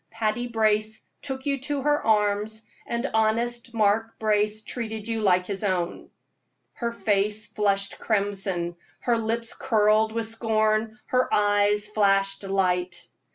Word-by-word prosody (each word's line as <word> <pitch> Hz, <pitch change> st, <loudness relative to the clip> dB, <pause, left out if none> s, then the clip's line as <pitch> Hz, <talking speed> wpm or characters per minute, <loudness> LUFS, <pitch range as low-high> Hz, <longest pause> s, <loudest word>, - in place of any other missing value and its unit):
Patty 225 Hz, +2 st, -2 dB
Brace 215 Hz, -1 st, +1 dB, 0.2 s
took 265 Hz, -1 st, -5 dB
you 280 Hz, -1 st, 0 dB
to 280 Hz, 0 st, -3 dB
her 295 Hz, 0 st, +2 dB
arms, 210 Hz, 0 st, +1 dB, 0.2 s
and 235 Hz, +3 st, -2 dB
honest 235 Hz, +2 st, 0 dB
Mark 225 Hz, 0 st, +1 dB
Brace 215 Hz, 0 st, +1 dB
treated 220 Hz, -2 st, -5 dB
you 225 Hz, -1 st, -2 dB
like 180 Hz, -3 st, +3 dB
his 195 Hz, +1 st, -5 dB
own." 180 Hz, -3 st, -2 dB, 0.6 s
Her 235 Hz, -1 st, -3 dB
face 210 Hz, -1 st, +1 dB
flushed 200 Hz, -2 st, -1 dB
crimson, 195 Hz, -5 st, -1 dB, 0.2 s
her 235 Hz, -2 st, +1 dB
lips 230 Hz, +1 st, -2 dB
curled 215 Hz, -1 st, +2 dB
with 230 Hz, 0 st, -2 dB
scorn, 220 Hz, -1 st, 0 dB
her 255 Hz, 0 st, +1 dB
eyes 205 Hz, 0 st, +3 dB
flashed 195 Hz, -2 st, +2 dB
light. 185 Hz, -2 st, -1 dB
215 Hz, 130 wpm, -25 LUFS, 205-230 Hz, 0.6 s, like